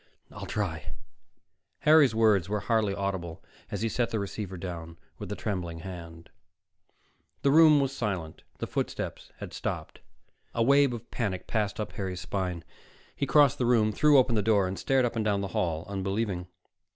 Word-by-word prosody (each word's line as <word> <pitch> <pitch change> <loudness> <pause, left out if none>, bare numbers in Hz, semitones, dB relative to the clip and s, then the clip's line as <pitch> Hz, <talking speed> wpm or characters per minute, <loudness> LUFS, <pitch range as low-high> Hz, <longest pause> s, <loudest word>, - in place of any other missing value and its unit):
"I'll - - -8
try." - - -3 0.9
Harry's 150 -6 +6
words 105 -5 +3
were 105 0 -1
hardly 110 -2 +1
audible 95 -4 -4 0.3
as - - -3
he - - +2
set 120 +1 0
the 110 - -2
receiver 100 -2 -4
down 85 -2 -7 0.2
with - - -6
a - - -2
trembling 85 -5 -4
hand. 85 -2 -9 1.1
The 140 - +4
room 155 -1 +7
was 135 -1 -1
silent. 95 -10 -3 0.2
The - - -3
footsteps - - -4
had - - -8
stopped. - - -5 0.5
A 115 - +2
wave 140 +2 +5
of 120 0 -8
panic 95 -6 -2
passed 105 -2 -1
up 105 - -3
Harry's 95 -3 -4
spine; 90 -4 -3 0.5
he 140 - -2
crossed 145 +1 +5
the 125 - +1
room, 110 -3 +4
threw 150 +6 +5
open 125 -2 +4
the 110 - +2
door, 100 -3 +2
stared 130 +4 +2
up 120 - -2
and 110 - 0
down 100 -2 +1
the 100 - -3
hall, 80 -2 -1
unbelieving. 95 -1 -2
105 Hz, 170 wpm, -28 LUFS, 95-120 Hz, 1.1 s, room